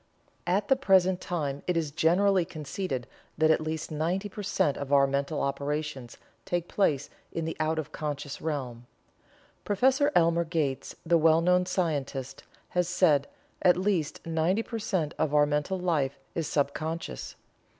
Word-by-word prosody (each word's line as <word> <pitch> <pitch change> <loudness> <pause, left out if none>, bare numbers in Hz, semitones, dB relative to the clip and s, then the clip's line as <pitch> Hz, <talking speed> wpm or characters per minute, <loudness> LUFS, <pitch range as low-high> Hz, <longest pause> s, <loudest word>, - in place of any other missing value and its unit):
At 195 +3 +1
the 270 - +5
present 190 -7 +3
time 145 -5 -3
it 180 -2 +1
is 155 -3 -1
generally 185 +5 +3
conceded 150 -4 -4 0.3
that 160 0 +4
at 160 - +3
least 155 0 -4
ninety 175 +7 -1
per 205 - -7
cent 150 -7 +1
of 140 -1 -6
our 140 -1 +6
mental 140 +2 -1
operations 140 -2 -3 0.3
take 175 +5 -2
place 145 -8 +1 0.2
in 165 - -3
the 160 - -3
out 160 0 0
of 155 -1 -4
conscious 145 -2 -5
realm. 125 -6 -4 0.8
Prof. 260 +7 +2
Elmer 170 0 +4
Gates, 155 -5 -2
the 170 -1 +4
well 160 +1 +5
known 180 +1 +3
scientist, 145 -7 -2 0.3
has 180 -1 0
said: 155 -6 +3 0.3
"At 180 -1 +5
least 185 -5 -1
ninety 165 +6 +1
per 230 -1 -5
cent 185 -8 -1
of 150 -2 +1
our 145 0 +6
mental 150 +6 -1
life 150 -7 0 0.2
is 165 -3 -2
sub 140 -1 +1
conscious. 160 +2 -5
160 Hz, 160 wpm, -28 LUFS, 145-180 Hz, 0.8 s, our